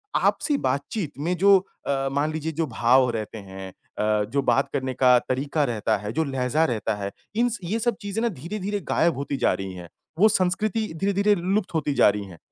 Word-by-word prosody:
आपसी 290 Hz, -3 st, +2 dB
बातचीत 140 Hz, -, -2 dB
में 175 Hz, +5 st, 0 dB
जो 200 Hz, +2 st, +6 dB, 0.3 s
अ, 135 Hz, -1 st, 0 dB
मान 145 Hz, +3 st, 0 dB
लीजिए 160 Hz, +1 st, -3 dB
जो 160 Hz, -, +2 dB
भाव 125 Hz, +2 st, +3 dB
रहते 110 Hz, -1 st, -5 dB
हैं 95 Hz, -1 st, -8 dB, 0.3 s
अ, 105 Hz, 0 st, +1 dB
जो 140 Hz, -, +1 dB
बात 135 Hz, +1 st, +2 dB
करने 130 Hz, -1 st, -1 dB
का 125 Hz, 0 st, +5 dB
तरीका 140 Hz, +5 st, -1 dB
रहता 110 Hz, -4 st, 0 dB
है, 105 Hz, +1 st, -5 dB
जो 160 Hz, +2 st, +1 dB
लहज़ा 135 Hz, +3 st, 0 dB
रहता 110 Hz, -4 st, -1 dB
है, 100 Hz, -1 st, -4 dB, 0.2 s
इनस 240 Hz, 0 st, +1 dB
ये 210 Hz, +7 st, -1 dB
सब 240 Hz, +1 st, 0 dB
चीज़ें 205 Hz, +2 st, -3 dB
ना 235 Hz, -, +2 dB
धीरे-धीरे 200 Hz, +5 st, -4 dB
गायब 165 Hz, -4 st, +2 dB
होती 140 Hz, 0 st, -3 dB
जा -, -, +2 dB
रही 95 Hz, -1 st, -5 dB
हैं, 90 Hz, -2 st, -10 dB, 0.3 s
वो 215 Hz, +3 st, +7 dB
संस्कृति 210 Hz, +3 st, 0 dB
धीरे-धीरे 200 Hz, +1 st, +2 dB
लुप्त 190 Hz, +2 st, -1 dB
होती 150 Hz, -3 st, 0 dB
जा -, -, +6 dB
रही 105 Hz, 0 st, -2 dB
हैं 90 Hz, -3 st, -12 dB
140 Hz, 200 wpm, -24 LUFS, 120-195 Hz, 0.3 s, वो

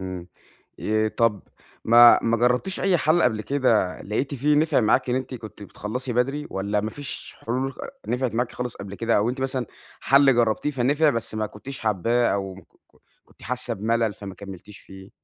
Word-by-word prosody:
إمم، 95 Hz, -2 st, -6 dB, 0.5 s
آآ، 110 Hz, 0 st, +1 dB
طب، 110 Hz, -2 st, 0 dB, 0.4 s
ما 120 Hz, +1 st, +8 dB
ما 115 Hz, 0 st, +2 dB
جربتيش 125 Hz, -, +1 dB
أي 190 Hz, -2 st, +3 dB
حل 160 Hz, +2 st, +2 dB
قبل 110 Hz, -3 st, +1 dB
كده 115 Hz, -9 st, +1 dB
لقيتِ 135 Hz, +8 st, -2 dB
فيه 145 Hz, +3 st, +2 dB
نفع 155 Hz, -2 st, +3 dB
معاكِ 115 Hz, +2 st, +2 dB
إن -, -, +1 dB
أنتِ 130 Hz, 0 st, -4 dB
كنتِ 110 Hz, -3 st, -10 dB
بتخلصي 120 Hz, +6 st, -5 dB
بدري؟ 135 Hz, +5 st, 0 dB
والّا 100 Hz, +2 st, -1 dB
ما 110 Hz, +1 st, -3 dB
فيش 145 Hz, +3 st, -7 dB
حلول 130 Hz, +3 st, -1 dB
خ -, -, -22 dB, 0.3 s
نفعت 125 Hz, -2 st, -1 dB
معاكِ 120 Hz, +1 st, -1 dB
خالص 125 Hz, -1 st, -5 dB
قبل 100 Hz, 0 st, -8 dB
كده؟ 115 Hz, +3 st, +1 dB
أو 105 Hz, +3 st, +2 dB
أنتِ 130 Hz, +2 st, -3 dB
مثلًا 130 Hz, -2 st, -2 dB, 0.3 s
حل 140 Hz, -1 st, +5 dB
جربتيه 120 Hz, +4 st, +1 dB
فنفع 145 Hz, +4 st, +2 dB
بس 115 Hz, -2 st, -4 dB
ما 110 Hz, 0 st, -1 dB
كنتيش 130 Hz, +6 st, -9 dB
حاباه 115 Hz, +3 st, +1 dB
أو 95 Hz, -1 st, -3 dB
ك 95 Hz, -, -12 dB
ك -, -, -33 dB, 0.5 s
كنتِ -, -, -24 dB
حاسة -, -, -3 dB
بملل 110 Hz, +1 st, 0 dB
فما 100 Hz, -1 st, -9 dB
كملتيش 95 Hz, 0 st, -11 dB
فيه؟ 95 Hz, 0 st, -14 dB
115 Hz, 190 wpm, -24 LUFS, 105-130 Hz, 0.5 s, ما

